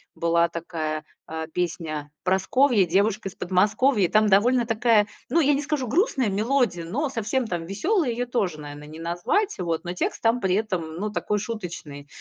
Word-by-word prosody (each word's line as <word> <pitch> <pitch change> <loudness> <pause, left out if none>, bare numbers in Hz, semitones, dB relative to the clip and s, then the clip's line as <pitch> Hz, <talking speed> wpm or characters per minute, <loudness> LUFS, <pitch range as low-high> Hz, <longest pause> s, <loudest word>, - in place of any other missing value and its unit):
была 170 0 +2
такая, 160 -2 -4 0.2
а, 160 0 -5
песня: 160 -3 -3
"Прасковья- 195 +4 +3
девушка 200 +4 +1
из 190 - -8
Подмосковья". 205 +4 +2
Там 215 0 +4
довольно 235 +5 +4
такая, 225 -2 +3 0.2
ну, 335 - +3
я 290 -1 +4
не 275 - 0
скажу, 290 -4 -2
грустная 270 - +1
мелодия, 210 -4 +1
но 270 - -2
совсем 235 +1 -1
там 170 -4 -3
веселой 295 - 0
её 245 +2 -2
тоже, 190 -10 -1
наверное, 145 0 -9
не 155 +1 -10
назвать, 175 - 0
вот. 165 -2 -2
Но 175 0 -4
текст - - -2
там 230 +2 +3
при 190 -4 +1
этом, 210 -5 -1
м, 160 0 -9
ну, 210 +1 -2
такой 210 0 -1
шуточный. 170 -10 -6
200 Hz, 175 wpm, -25 LUFS, 170-245 Hz, 0.2 s, Там